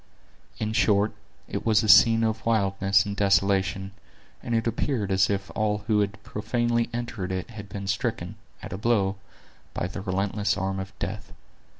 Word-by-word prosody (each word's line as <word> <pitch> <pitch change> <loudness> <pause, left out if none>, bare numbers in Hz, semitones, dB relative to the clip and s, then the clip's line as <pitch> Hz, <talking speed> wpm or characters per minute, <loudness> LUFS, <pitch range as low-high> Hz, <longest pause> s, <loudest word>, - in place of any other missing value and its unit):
In 110 0 -2
short, 105 -1 +3 0.3
it - - -4
was 110 -1 +3
a - - -1
scene 115 +1 +7
of 110 0 -1
wildness 100 -3 +2
and 100 -1 -4
desolation; 95 -1 +1 0.5
and 120 - -2
it 115 - +1
appeared 115 -2 -1
as 95 +1 +3
if 100 -1 -2
all 105 -1 0
who 110 -1 +2
had 100 0 -2
profanely 120 +2 -1
entered 120 -6 -4
it 95 +4 -4
had 105 -3 -9
been 100 -1 -6
stricken, 100 -1 -2 0.3
at 105 -2 -6
a 95 - -5
blow, 105 -4 +1 0.6
by - - -1
the 95 +2 -5
relentless 100 +2 -1
arm 95 +1 -2
of 95 0 -6
death. - - -5
105 Hz, 170 wpm, -26 LUFS, 95-110 Hz, 0.6 s, scene